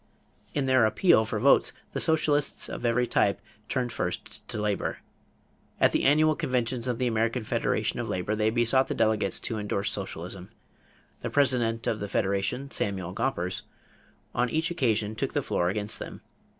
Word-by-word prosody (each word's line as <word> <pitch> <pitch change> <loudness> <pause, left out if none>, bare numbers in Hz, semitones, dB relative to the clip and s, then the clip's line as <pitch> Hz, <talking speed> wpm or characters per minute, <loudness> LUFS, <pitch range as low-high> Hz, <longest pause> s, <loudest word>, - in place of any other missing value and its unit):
In 140 - +1
their 130 -4 +4
appeal 110 - +4
for 110 -1 -2
votes, 135 +5 +4 0.2
the - - -2
socialists 155 -3 +1
of - - -6
every 120 +1 +2
type 100 -4 +2 0.3
turned 125 -2 -1
first 90 -4 -4
to 110 - -5
labor. 105 -1 -1 0.8
At - - +5
the - - 0
annual 155 +2 +5
conventions 125 -4 -1
of 125 -2 -1
the 125 - 0
American 115 +1 0
Federation - - -1
of - - -3
Labor 95 +4 -1
they 110 0 +2
besought 120 +3 +3
the - - -3
delegates 110 -4 +1
to 110 - -3
endorse 100 -1 -1
socialism. 95 -1 -5 0.7
The - - -3
president 125 -5 +2
of 110 - 0
the 100 - -4
Federation, 100 +8 -1
Samuel 95 -3 -2
Gompers, 95 -6 -2 0.7
on 125 0 +1
each 160 +4 0
occasion 110 -10 +1
took 110 - -3
the - - 0
floor 85 - 0
against 105 +2 -1
them. - - -8
115 Hz, 165 wpm, -27 LUFS, 105-130 Hz, 0.8 s, At